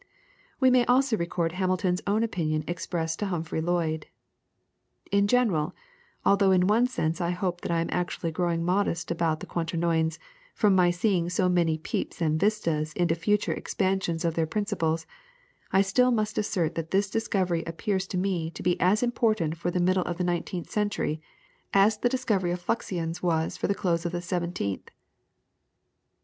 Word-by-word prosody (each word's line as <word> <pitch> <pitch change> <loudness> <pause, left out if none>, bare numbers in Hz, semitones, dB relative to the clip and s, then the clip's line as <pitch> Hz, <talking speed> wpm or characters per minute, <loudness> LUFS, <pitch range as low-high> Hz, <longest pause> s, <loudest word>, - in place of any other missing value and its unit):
We 260 -1 +5
may 250 -1 +5
also 255 0 +3
record 170 -2 -1
Hamilton's 185 0 0
own 210 +3 +2
opinion 155 -8 -1
expressed 170 -1 -3
to 205 - -1
Humphrey 165 -3 -2
Lloyd: 160 -2 -1 1.0
"In 200 0 +3
general, 205 -11 +2 0.5
although 200 -1 +4
in 185 -1 +4
one 225 +5 +4
sense 165 -8 -2
I 170 - 0
hope 180 0 -2
that - - -5
I 165 0 +2
am 165 - -2
actually 175 -2 -2
growing 170 0 -1
modest 180 -2 0
about 165 -2 0
the - - -5
quaternions, 165 -1 0 0.4
from 210 -3 +4
my 180 -1 +5
seeing 175 -1 +1
so 185 +1 +1
many 170 -3 +2
peeps 160 - -4
and 155 -2 +1
vistas 165 -7 0
into 175 -1 +1
future 205 +5 +1
expansions 185 -4 -1
of 165 - +1
their 165 0 0
principles, 165 -4 -1 0.7
I 195 +1 +5
still 250 +6 +3
must 215 -3 0
assert 180 -6 0
that 165 -1 -4
this 195 +1 +2
discovery 190 -5 0
appears 190 +3 -2
to 185 - -3
me 180 -3 -1
to - - -9
be 180 0 +1
as 200 +6 +3
important 220 -9 +1
for 170 +1 -2
the 180 - -1
middle 185 +1 +2
of 175 - -3
the 180 - -1
nineteenth 175 0 -3
century 205 -7 -1 0.5
as 210 +2 +4
the 245 - +2
discovery 220 -8 0
of 175 +1 -2
fluxions 175 -6 -2
was 165 -2 0
for - - -2
the 200 - +1
close 170 -4 0
of 170 - -6
the 175 - -2
seventeenth." 170 - -3
180 Hz, 170 wpm, -27 LUFS, 165-200 Hz, 1.0 s, We